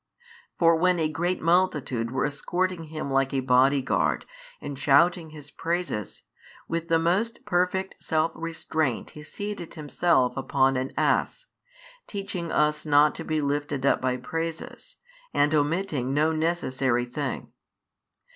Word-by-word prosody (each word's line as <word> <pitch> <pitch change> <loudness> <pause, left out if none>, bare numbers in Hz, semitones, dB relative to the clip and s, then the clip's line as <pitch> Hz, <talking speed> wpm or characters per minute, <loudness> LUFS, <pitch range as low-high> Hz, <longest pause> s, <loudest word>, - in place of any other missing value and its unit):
For 165 -1 +5
when 180 +2 +3
a 160 -2 +1
great 170 +4 -2
multitude 155 -9 +1
were 130 +2 0
escorting 175 +4 -2
Him 155 -3 -5
like 135 0 +1
a - - +2
body 130 +2 +3
guard - - 0 0.3
and 140 -2 -7
shouting 160 +4 +3
His 150 -1 -12
praises, 165 - -3 0.4
with 165 0 -3
the 165 -1 +3
most 185 +8 0
perfect 185 +2 -1
self 160 +1 +1
restraint 160 -5 -2
He 150 - -11
seated 205 +2 -6
Himself 145 -4 +1
upon 135 0 +2
an 130 +1 -2
ass, - - +1 0.6
teaching 195 -4 -4
|142 - - -5
us 150 0 +2
not 145 0 +5
to - - -6
be 155 -1 -1
lifted 145 -1 -2
up - - +3
by 130 -1 0
praises, 165 - -5 0.4
and 145 +2 +3
omitting 150 -3 0
no 155 +2 +3
necessary 135 -7 0
thing. 130 +1 -5
155 Hz, 140 wpm, -26 LUFS, 135-170 Hz, 0.6 s, For